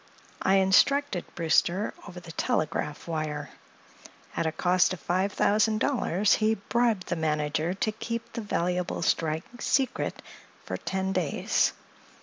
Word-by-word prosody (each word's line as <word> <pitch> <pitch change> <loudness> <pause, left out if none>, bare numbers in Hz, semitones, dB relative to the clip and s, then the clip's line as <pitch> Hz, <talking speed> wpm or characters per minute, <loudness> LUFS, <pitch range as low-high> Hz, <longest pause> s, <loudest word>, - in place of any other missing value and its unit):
I 195 - +3
instructed 195 +4 +3
Brewster 175 +4 +2
over 180 0 -8
the 175 -1 -10
telegraph 150 -1 -2
wire. 150 -3 -3 0.8
At 160 - 0
a - - 0
cost 180 +3 +2
of 185 - -6
five 185 +6 0
thousand 215 +2 +2
dollars 210 - +2
we 220 +1 +3
bribed 225 -1 0
the 175 - 0
manager 155 +2 0
to 215 +2 0
keep 230 +1 -5
the 230 - -3
valuable 180 -3 -1
strike 160 +9 -1
secret 270 -2 0 0.4
for - - -3
ten 190 0 -2
days. 175 -6 +1
185 Hz, 135 wpm, -27 LUFS, 160-215 Hz, 0.8 s, I